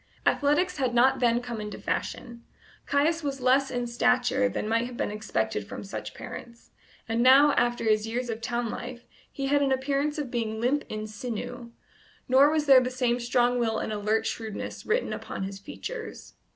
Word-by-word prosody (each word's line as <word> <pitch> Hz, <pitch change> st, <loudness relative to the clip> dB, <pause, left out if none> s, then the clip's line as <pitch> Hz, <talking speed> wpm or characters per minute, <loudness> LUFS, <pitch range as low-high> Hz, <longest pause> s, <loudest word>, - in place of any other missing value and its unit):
Athletics 305 Hz, +5 st, +2 dB
had 255 Hz, -3 st, 0 dB
not 260 Hz, +3 st, +4 dB
then 240 Hz, -1 st, +3 dB
come 235 Hz, -3 st, -5 dB
into 210 Hz, 0 st, -6 dB
fashion; 235 Hz, -1 st, -4 dB, 0.4 s
Caius 310 Hz, +4 st, +2 dB
was 280 Hz, -2 st, -3 dB
less 260 Hz, +2 st, +3 dB
in 245 Hz, -2 st, -2 dB
stature 250 Hz, +2 st, +2 dB
than 210 Hz, -, -3 dB
might 230 Hz, +2 st, +1 dB
have 250 Hz, -1 st, -9 dB
been -, -, -1 dB
expected 110 Hz, -, -2 dB
from -, -, -7 dB
such 195 Hz, -, -7 dB
parents; 235 Hz, -1 st, -10 dB, 0.4 s
and 225 Hz, +1 st, 0 dB
now, 270 Hz, +4 st, +7 dB
after 240 Hz, -1 st, +1 dB
his 215 Hz, -1 st, +2 dB
years 240 Hz, +2 st, -2 dB
of 225 Hz, -1 st, -4 dB
town 235 Hz, -1 st, -2 dB
life, 245 Hz, 0 st, -7 dB, 0.3 s
he 275 Hz, -, -4 dB
had 285 Hz, +1 st, +2 dB
an 275 Hz, -1 st, +2 dB
appearance 275 Hz, +3 st, 0 dB
of 285 Hz, -5 st, -4 dB
being 220 Hz, -2 st, -2 dB
limp 260 Hz, +5 st, +1 dB
in 215 Hz, 0 st, -4 dB
sinew, 240 Hz, +2 st, -6 dB, 0.6 s
nor 270 Hz, +3 st, +6 dB
was 305 Hz, -1 st, +1 dB
there 270 Hz, -3 st, +8 dB
the 250 Hz, -, -1 dB
same 250 Hz, -1 st, 0 dB
strong 245 Hz, 0 st, +2 dB
will 225 Hz, -2 st, 0 dB
and 215 Hz, -, -3 dB
alert 215 Hz, +2 st, 0 dB
shrewdness 220 Hz, -3 st, -5 dB
written 465 Hz, +3 st, 0 dB
upon -, -, -5 dB
his 195 Hz, 0 st, -5 dB
features. 455 Hz, -, -8 dB
245 Hz, 185 wpm, -27 LUFS, 225-270 Hz, 0.6 s, there